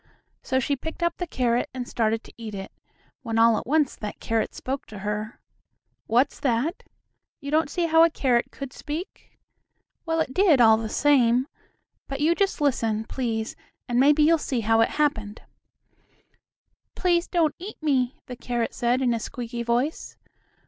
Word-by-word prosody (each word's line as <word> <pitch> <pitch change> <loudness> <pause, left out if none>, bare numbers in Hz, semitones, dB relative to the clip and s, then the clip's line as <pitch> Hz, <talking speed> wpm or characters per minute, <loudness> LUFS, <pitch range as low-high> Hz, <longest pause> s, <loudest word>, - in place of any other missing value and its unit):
So 260 - 0
she 280 +2 0
picked 320 +5 -6
up 340 0 0
the 355 - -4
carrot 245 -4 0
and 250 -1 -4
started 225 0 0
to - - -15
eat 220 -3 -7
it, 195 0 -7 0.5
when 225 -2 -3
all 230 0 +5
at - - -10
once 300 -1 +2
that 210 -1 -7
carrot 225 -1 -1
spoke 270 +1 -4
to 215 - -10
her. 210 +2 -3 0.7
What's 245 +5 +2
that? 270 - 0 0.6
You 280 -1 -6
don't 315 0 +2
see 345 +3 -1
how 325 0 +5
a 335 - +5
carrot 250 -6 +1
could 275 -2 -8
speak? 320 +5 -7 0.7
Well, 325 -1 -1
it 295 -5 -1
did 365 -8 +4
all 220 -2 +7
the 220 -1 -4
same. 255 -2 +3 0.6
But 275 0 -5
you 310 +3 +3
just 390 +1 0
listen, 225 -7 +1
please, 225 -3 -3 0.3
and 245 0 +1
maybe 295 +3 +5
you'll 325 +1 +4
see 255 -5 -2
how 225 +1 +3
it 225 - +3
happened. 220 -9 -1 1.5
"Please 350 -1 +1
don't 330 -4 +1
eat 390 +5 -8
me," 265 -5 +1
the 250 - -7
carrot 240 -2 -3
said, 245 +2 +1
in 245 -2 +2
a 230 - -1
squeaky 235 +1 -5
voice. 240 +6 -1
255 Hz, 170 wpm, -25 LUFS, 230-305 Hz, 1.5 s, all